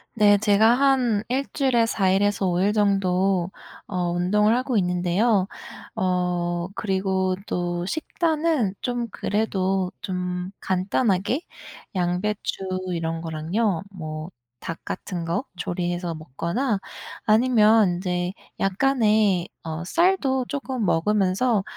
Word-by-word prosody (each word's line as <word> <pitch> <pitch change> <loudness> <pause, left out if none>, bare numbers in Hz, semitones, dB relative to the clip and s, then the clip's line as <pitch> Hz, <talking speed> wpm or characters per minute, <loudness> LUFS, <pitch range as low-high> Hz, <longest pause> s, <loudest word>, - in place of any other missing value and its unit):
네. 205 -2 +6
제가 215 +2 +4
한 250 -5 +2
1 265 +3 0
주일에 255 -5 +3
4 200 -4 +1
일에서 200 +1 +2
5 175 -1 +1
일 205 +2 +2
정도 195 -3 +2 0.4
어 180 -3 -1
운동을 210 +5 +2
하고 255 0 -1
있는데요. 185 +3 +2 0.5
어 175 -1 0
그리고 190 -1 0
또 175 0 -2
식단은 315 - 0
좀 245 -1 -2
그래도 195 -3 0
좀 180 -1 -3
간단하게 195 - 0 0.5
양배추 190 +2 -1 0.3
이런 165 -1 -2
거랑요. 165 +4 -1
뭐 155 -3 -6 0.3
닭 165 - -6
같은 180 -2 -5
거 170 +10 -2
조리 175 0 -2
해서 175 -1 -3
먹거나 170 - -2 0.4
아니면 220 -3 +5
인제 180 0 -2 0.3
약간의 210 -3 +2 0.2
어 160 +1 -5
쌀도 295 - +2
쪼끔 265 -4 -3
먹으면서 200 +5 +2
195 Hz, 210 characters per minute, -24 LUFS, 180-225 Hz, 0.5 s, 네